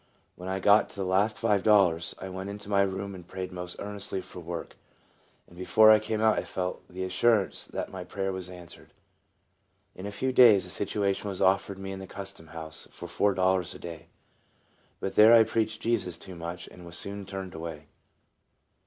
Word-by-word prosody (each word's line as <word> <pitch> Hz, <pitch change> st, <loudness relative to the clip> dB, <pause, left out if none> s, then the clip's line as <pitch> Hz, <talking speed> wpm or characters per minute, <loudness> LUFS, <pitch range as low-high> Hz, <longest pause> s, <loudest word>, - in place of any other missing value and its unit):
When 90 Hz, +1 st, -7 dB
I 95 Hz, 0 st, -1 dB
got 105 Hz, +2 st, +5 dB
to -, -, -14 dB
the 100 Hz, -1 st, -3 dB
last 100 Hz, +4 st, +2 dB
five 100 Hz, -2 st, +2 dB
dollars, 95 Hz, -6 st, +3 dB
I 95 Hz, -, -7 dB
went 95 Hz, +1 st, -6 dB
into 100 Hz, 0 st, -8 dB
my 100 Hz, -1 st, +4 dB
room 100 Hz, 0 st, -2 dB
and 90 Hz, -2 st, -11 dB
prayed 95 Hz, 0 st, -6 dB
most 90 Hz, -1 st, -5 dB
earnestly 100 Hz, -1 st, -3 dB
for 90 Hz, -, -9 dB
work, 85 Hz, 0 st, -6 dB, 0.7 s
and 85 Hz, -, -18 dB
before 110 Hz, +4 st, +6 dB
I 110 Hz, -, +7 dB
came 110 Hz, 0 st, -3 dB
out 110 Hz, -1 st, +4 dB
I -, -, -3 dB
felt 90 Hz, 0 st, -4 dB
the 95 Hz, +1 st, -5 dB
assurance 95 Hz, +2 st, +2 dB
that -, -, -5 dB
my 95 Hz, -1 st, -6 dB
prayer 95 Hz, +1 st, -3 dB
was 95 Hz, -1 st, -5 dB
answered. 90 Hz, -2 st, -13 dB, 1.0 s
In 95 Hz, +2 st, -7 dB
a -, -, -5 dB
few 130 Hz, +6 st, -1 dB
days 115 Hz, -7 st, +7 dB
a 90 Hz, -, -6 dB
situation 100 Hz, 0 st, -1 dB
was 95 Hz, -, -5 dB
offered 95 Hz, +1 st, +2 dB
me 95 Hz, 0 st, -6 dB
in 95 Hz, -, -6 dB
the 95 Hz, -, -8 dB
Custom 100 Hz, -5 st, -7 dB
House 80 Hz, -1 st, -7 dB
for -, -, -9 dB
four 100 Hz, -1 st, +1 dB
dollars 95 Hz, -2 st, +1 dB
a -, -, -10 dB
day. 85 Hz, -2 st, -9 dB, 0.9 s
But 95 Hz, -, -3 dB
there 110 Hz, +2 st, +8 dB
I 115 Hz, -, +8 dB
preached 110 Hz, 0 st, -1 dB
Jesus 105 Hz, -7 st, 0 dB
too 95 Hz, -, -9 dB
much, 85 Hz, +1 st, -6 dB
and 90 Hz, -, -13 dB
was 85 Hz, 0 st, -7 dB
soon 100 Hz, -1 st, -6 dB
turned 95 Hz, -2 st, -6 dB
away. 80 Hz, -2 st, -7 dB
95 Hz, 200 wpm, -28 LUFS, 90-100 Hz, 1.0 s, there